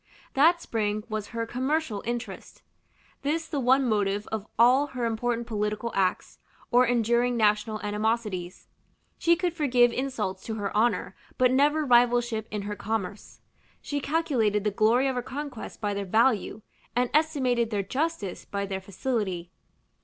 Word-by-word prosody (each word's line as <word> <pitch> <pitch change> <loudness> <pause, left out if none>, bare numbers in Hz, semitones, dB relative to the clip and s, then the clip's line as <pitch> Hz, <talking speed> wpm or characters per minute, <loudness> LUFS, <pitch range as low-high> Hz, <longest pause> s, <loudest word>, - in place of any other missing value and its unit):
That 330 +6 +5
spring 210 -1 -1
was 215 -1 -3
her 230 -1 -3
commercial 255 -2 -1
interest, 240 0 -6 0.6
this 320 +3 -1
the 295 - -2
one 260 +1 +3
motive 205 -2 0
of 220 -1 -3
all 255 +5 +5
her 250 -4 -3
important 235 +1 -1
political 215 +1 -2
acts, 185 -2 -1 0.3
or 245 +1 +5
enduring 240 +1 +2
national 215 0 +2
animosities. 210 -3 -2 0.5
She 340 0 +4
could 355 -1 -1
forgive 250 -7 +3
insults 230 -8 -3
to 220 - -3
her 205 -2 -4
honor, 230 +3 +1 0.2
but 250 -1 +4
never 295 +3 +3
rivalship 240 -3 +3
in 210 -1 -4
her 205 +1 -4
commerce; 210 -2 -4 0.4
she 290 - -3
calculated 270 -9 +1
the 210 - +1
glory 230 +6 +3
of 265 - 0
her 250 - -2
conquests 270 -1 -7
by 205 -2 -2
their 200 0 -3
value, 220 +1 +1 0.3
and 245 0 +1
estimated 260 -7 +2
their 205 -3 -1
justice 260 - -3
by 200 0 -3
their 190 -1 -4
facility. 190 -3 -3
235 Hz, 150 wpm, -27 LUFS, 210-260 Hz, 0.6 s, That